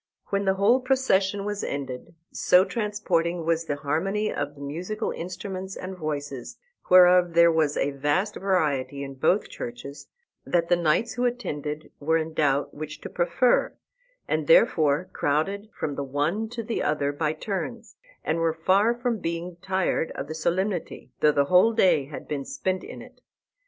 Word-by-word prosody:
When 200 0 0
the 190 0 +2
whole 210 +6 +4
procession 205 -7 +1
was 205 -1 -3
ended 135 +3 -5 0.2
so 180 +1 +4
transporting 180 -7 -1
was 165 0 +1
the 145 - -2
harmony 175 +9 -1
of 145 0 -3
the 140 - -13
musical 180 +10 -4
instruments 185 +2 -6
and 185 +1 -6
voices, 145 -6 -5 0.3
whereof 180 -1 +6
there 170 0 +7
was 155 -3 +1
a 145 - +1
vast 145 +9 0
variety 145 -8 0
in 135 0 -6
both 175 +9 +1
churches, 125 +4 -8 0.4
that 170 -1 0
the 175 - +5
knights 175 +7 +1
who 245 +2 -1
attended 155 - -3
were 160 +3 +2
in 160 0 -3
doubt 145 -2 +1
which 155 +1 -7
to - - -8
prefer, 175 +8 +2 0.5
and - - -1
therefore 175 - +4
crowded 195 +9 -1
from 145 - -4
the 140 - -3
one 150 +11 -1
to 235 0 -5
the 225 +1 -2
other 145 -1 0
by 150 +1 -1
turns, 205 +7 -5 0.3
and 160 +2 0
were 165 -1 +1
far 195 +8 +3
from 240 -2 -2
being 170 0 -4
tired 190 -3 0
of 135 - -5
the 155 - -5
solemnity, 175 -3 -2
though 150 - +5
the 140 -1 +2
whole 185 +8 +5
day 185 -10 +3
had 145 +1 -9
been 145 -2 -3
spent 190 - -3
in - - -9
it. - - -17
170 Hz, 165 wpm, -25 LUFS, 150-200 Hz, 0.5 s, there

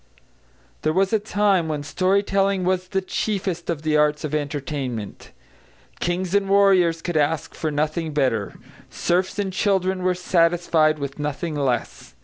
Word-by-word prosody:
There 155 - +1
was 190 +4 +1
a 220 - +4
time 205 -4 +1
when 150 -2 -3
story 185 +6 +1
telling 195 -1 +1
was 185 0 0
the 190 +1 -1
chiefest 190 -3 -2
of 160 -3 -2
the 155 -1 +2
arts 150 0 +2
of 155 -1 -4
entertainment; 140 -6 -4 0.7
kings 175 +1 -2
and 200 -1 +2
warriors 185 -4 +4
could 175 -2 -1
ask 150 +1 0
for 160 - -3
nothing 155 +2 -1
better; 130 -8 0 0.3
serfs 180 +3 -1
and 195 -2 -2
children 190 -1 +1
were 180 0 +1
satisfied 170 -3 +2
with 140 0 -6
nothing 150 +3 -3
less. 135 -5 -2
170 Hz, 150 wpm, -23 LUFS, 150-190 Hz, 0.7 s, a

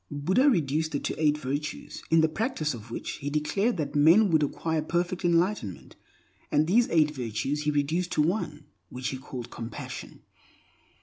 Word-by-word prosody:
Buddha 185 - +3
reduced 155 - 0
it - - -2
to - - -3
eight 150 0 +4
virtues, 150 +2 -4
in 165 0 +5
the 160 - +4
practice 160 - -2
of 115 0 -10
which 115 - -5
he 140 - -4
declared 185 +10 0
that 145 -3 -3
men 170 +8 +6
would 160 -1 +4
acquire 160 +2 -1
perfect 175 +4 -1
enlightenment. 170 - 0 0.6
And 150 - +3
these 230 +8 +3
eight 155 -2 +3
virtues 135 +3 -3
he - - +2
reduced 155 +5 0
to 150 - +3
one, 155 -4 -2 0.2
which 125 0 -4
he 130 - -4
called 130 -3 -8
compassion. 115 0 -7
155 Hz, 170 wpm, -27 LUFS, 145-175 Hz, 0.6 s, men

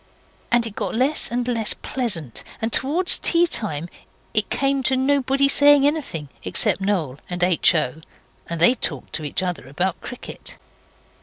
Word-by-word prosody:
And 240 -1 +3
it 220 -3 -8
got - - -3
less 265 +6 +1
and 245 +1 -2
less 230 -3 +2
pleasant, 185 - -3 0.2
and 225 +1 -3
towards 330 +7 +4
teatime 215 - +1 0.5
it 215 -1 +1
came 275 0 0
to 260 +1 +2
nobody 275 0 +2
saying 285 0 +6
anything 255 - -2
except - - 0
Noel 170 -9 -2
and 180 0 -3
H. 180 0 +4
O. 155 0 -2 0.5
and 170 -1 -4
they 175 +9 +5
talked 145 - -3
to 155 - -2
each 150 +5 -2
other 180 -7 -4
about 175 +6 -3
cricket. 250 - -8
225 Hz, 155 wpm, -21 LUFS, 170-270 Hz, 0.5 s, saying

